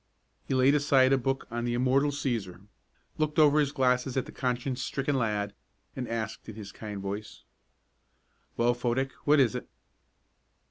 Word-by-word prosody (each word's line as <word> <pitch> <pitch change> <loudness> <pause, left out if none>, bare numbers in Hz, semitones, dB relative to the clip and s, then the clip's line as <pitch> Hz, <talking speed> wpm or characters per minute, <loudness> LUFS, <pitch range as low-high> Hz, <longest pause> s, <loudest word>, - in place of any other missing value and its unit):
He 135 - 0
laid 130 +2 +5
aside 135 -2 +4
a - - +5
book 135 +2 -1
on 120 0 -2
the 120 0 -1
immortal 130 +4 +3
Cæsar, 110 -10 -3 0.5
looked 155 +1 0
over 150 -1 +6
his 145 -2 +2
glasses 125 -1 +1
at 130 - 0
the - - -10
conscience 125 0 -2
stricken 135 +2 -1
lad, 105 -4 -1 0.4
and 125 -2 -4
asked 110 -1 -4
in 110 - -8
his 105 -3 -8
kind 105 -2 -7
voice: 100 +2 -6 1.1
"Well, 120 +1 +3
Fodick, 125 +2 -1
what 150 0 +5
is 130 -4 +4
it?" 125 - -6
125 Hz, 165 wpm, -29 LUFS, 115-135 Hz, 1.1 s, over